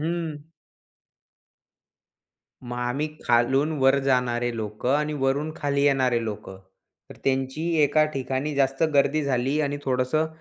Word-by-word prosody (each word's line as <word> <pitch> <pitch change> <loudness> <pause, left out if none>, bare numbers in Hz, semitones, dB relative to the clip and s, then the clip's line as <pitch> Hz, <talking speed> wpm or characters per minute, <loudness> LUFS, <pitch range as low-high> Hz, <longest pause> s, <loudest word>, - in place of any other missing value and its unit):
हं. 165 -1 -2 2.3
मग 120 0 -6
आम्ही 125 +5 -1 0.2
खालून 130 +6 +2
वर 135 +1 +4
जाणारे 120 -2 +1
लोकं 110 +5 -1
आणि 150 +1 -1
वरून 140 +4 0
खाली 140 -1 -1
येणारे 130 -4 +2
लोकं, 105 -3 -6 0.5
तर - - -11
त्यांची 135 +4 -1 0.2
एका 155 +2 +4
ठिकाणी 135 +2 -2
जास्त 135 +2 +1
गर्दी 145 +2 +3
झाली 135 +2 0
आणि 145 -1 -1
थोडंसं 130 +4 +1
135 Hz, 120 wpm, -25 LUFS, 125-145 Hz, 2.3 s, वर